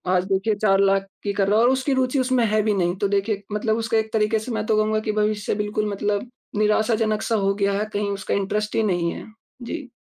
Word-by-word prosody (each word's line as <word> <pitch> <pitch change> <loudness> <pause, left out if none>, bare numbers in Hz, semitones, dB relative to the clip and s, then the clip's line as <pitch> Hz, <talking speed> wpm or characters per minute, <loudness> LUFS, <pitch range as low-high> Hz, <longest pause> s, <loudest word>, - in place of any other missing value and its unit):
आज 180 - +2
देखिए 205 +3 +1
4 195 -2 +2
लाख 195 0 +2 0.2
की 200 - -1
कर 200 -1 +1
रहा 210 +2 +3
है 235 - +5
और 255 - +5
उसकी 265 +1 0
रुचि 260 +1 +1
उसमें 255 -2 +2
है 215 0 +2
भी 215 0 +1
नहीं, 175 -2 0
तो 200 +1 0
देखिए 200 +1 -1
मतलब 220 +1 0
उसका 225 0 0
एक 220 0 -1
तरीके 215 0 +2
से 220 +4 -6
मैं 215 -1 -2
तो 215 -1 +2
कहूँगा 215 0 +2
कि - - +4
भविष्य 210 -1 0
बिल्कुल 210 0 -1
मतलब 205 +3 -2 0.3
निराशाजनक-सा 215 +1 +1
हो 195 - +2
गया 200 -1 +1
है 210 - 0
कहीं 205 0 -1
उसका 200 -1 -3
इंटरेस्ट 210 +2 -1
ही 225 - +2
नहीं 170 -1 0
है। - - -8 0.4
जी। 280 +2 -6
210 Hz, 240 wpm, -23 LUFS, 200-225 Hz, 0.4 s, है